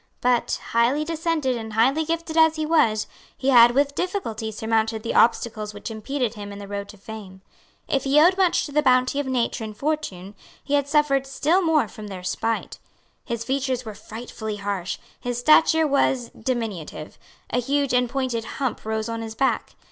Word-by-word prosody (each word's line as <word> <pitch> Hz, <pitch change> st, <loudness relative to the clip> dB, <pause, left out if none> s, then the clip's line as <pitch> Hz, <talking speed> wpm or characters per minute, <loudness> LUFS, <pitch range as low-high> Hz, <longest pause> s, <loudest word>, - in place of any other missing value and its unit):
But, 245 Hz, -1 st, +1 dB
highly 245 Hz, +6 st, +2 dB
descended 325 Hz, -5 st, -1 dB
and 220 Hz, -2 st, -6 dB
highly 265 Hz, +8 st, +3 dB
gifted 330 Hz, 0 st, -3 dB
as 320 Hz, -1 st, +5 dB
he 310 Hz, -1 st, -2 dB
was, 285 Hz, -10 st, +3 dB, 0.3 s
he 270 Hz, -, 0 dB
had 240 Hz, -2 st, +7 dB
with 280 Hz, +1 st, +2 dB
difficulty 230 Hz, -, -3 dB
surmounted 220 Hz, 0 st, -1 dB
the 230 Hz, -, -2 dB
obstacles 215 Hz, -2 st, +2 dB
which 205 Hz, -, -6 dB
impeded 240 Hz, +2 st, -2 dB
him 205 Hz, -2 st, -8 dB
in 200 Hz, -, -8 dB
the 200 Hz, 0 st, -8 dB
road 200 Hz, 0 st, -5 dB
to 210 Hz, -, -12 dB
fame. 195 Hz, -2 st, -10 dB, 0.4 s
If 270 Hz, -, 0 dB
he 275 Hz, +2 st, +4 dB
owed 350 Hz, +4 st, +6 dB
much 375 Hz, -2 st, +2 dB
to 290 Hz, -, -8 dB
the 300 Hz, +1 st, +3 dB
bounty 255 Hz, 0 st, +3 dB
of 285 Hz, -, -2 dB
nature 245 Hz, -2 st, -1 dB
and 215 Hz, -1 st, -7 dB
fortune, 210 Hz, -11 st, -3 dB, 0.3 s
he 285 Hz, -, -4 dB
had 285 Hz, -1 st, +2 dB
suffered 285 Hz, -2 st, +2 dB
still 310 Hz, +7 st, +2 dB
more 320 Hz, -, +2 dB
from 210 Hz, 0 st, -10 dB
their 190 Hz, -3 st, -8 dB
spite. 225 Hz, +4 st, -2 dB, 0.5 s
His 235 Hz, -2 st, -3 dB
features 260 Hz, 0 st, -1 dB
were 215 Hz, -, -6 dB
frightfully 220 Hz, 0 st, -7 dB
harsh, 200 Hz, -3 st, -3 dB, 0.2 s
his 245 Hz, -1 st, -3 dB
stature 315 Hz, +4 st, +5 dB
was 265 Hz, -4 st, +1 dB
diminutive; 220 Hz, -11 st, -4 dB, 0.3 s
a 245 Hz, -, +1 dB
huge 280 Hz, +2 st, 0 dB
and 250 Hz, -1 st, +2 dB
pointed 255 Hz, -4 st, -2 dB
hump 265 Hz, -4 st, -2 dB
rose 220 Hz, 0 st, -2 dB
on 230 Hz, 0 st, -4 dB
his 220 Hz, -1 st, -6 dB
back. 270 Hz, +3 st, 0 dB
245 Hz, 185 wpm, -24 LUFS, 220-285 Hz, 0.5 s, had